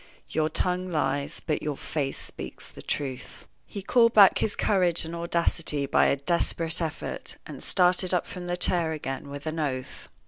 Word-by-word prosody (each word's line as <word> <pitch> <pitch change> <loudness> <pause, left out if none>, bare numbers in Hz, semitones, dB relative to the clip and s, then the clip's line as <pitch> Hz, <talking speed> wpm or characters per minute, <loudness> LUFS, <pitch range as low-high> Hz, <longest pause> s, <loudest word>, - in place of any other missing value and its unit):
"Your 155 0 +1
tongue 180 +3 -1
lies, 150 -1 -1
but 150 - 0
your 150 -2 -3
face 140 -3 -3
speaks - - -7
the - - -11
truth." 135 -3 -4 0.2
He 200 - -7
called 230 +2 +4
back 200 -3 +8
his 210 - +1
courage 180 -5 +2
and 165 - -6
audacity 170 -3 0
by 135 - +4
a - - +3
desperate 165 +2 0
effort, 160 -2 -4
and - - -9
started 180 0 +3
up 180 -2 +1
from 180 -1 -7
the 175 0 -1
chair 170 -2 +1
again 140 -2 -5
with 145 0 -7
an 160 +1 -3
oath. 130 -4 -4
165 Hz, 175 wpm, -27 LUFS, 145-180 Hz, 0.2 s, back